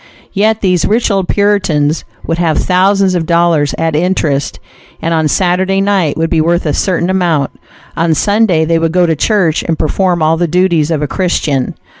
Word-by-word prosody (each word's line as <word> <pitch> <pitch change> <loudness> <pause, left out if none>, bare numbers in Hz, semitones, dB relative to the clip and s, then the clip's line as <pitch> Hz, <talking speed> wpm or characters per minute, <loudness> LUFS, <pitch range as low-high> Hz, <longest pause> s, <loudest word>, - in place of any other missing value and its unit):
Yet 215 +2 +1
these 180 -3 +1
rich 225 +1 +1
old 195 -2 0
Puritans 180 -7 0 0.2
would 165 +1 -2
have 165 -3 +1
thousands 190 +1 +2
of 170 -3 -2
dollars 170 -4 +1
at 165 -1 -1
interest, 155 -4 -1 0.4
and 165 - -2
on 160 -1 +1
Saturday 185 +4 0
night 195 -6 0
would 165 0 -1
be 160 - +2
worth 170 +2 0
a 150 - 0
certain 180 +1 0
amount; 170 -7 0 0.4
on 165 -1 +1
Sunday 200 -3 +1
they 165 +1 +1
would 165 0 -1
go 180 -1 +3
to 165 -1 0
church 175 -2 +1
and 165 -2 -2
perform 175 +2 0
all 160 +1 +2
the 175 +1 0
duties 170 -2 +1
of 155 -3 -1
a - - -1
Christian. 150 -7 -1
170 Hz, 185 wpm, -12 LUFS, 160-190 Hz, 0.4 s, go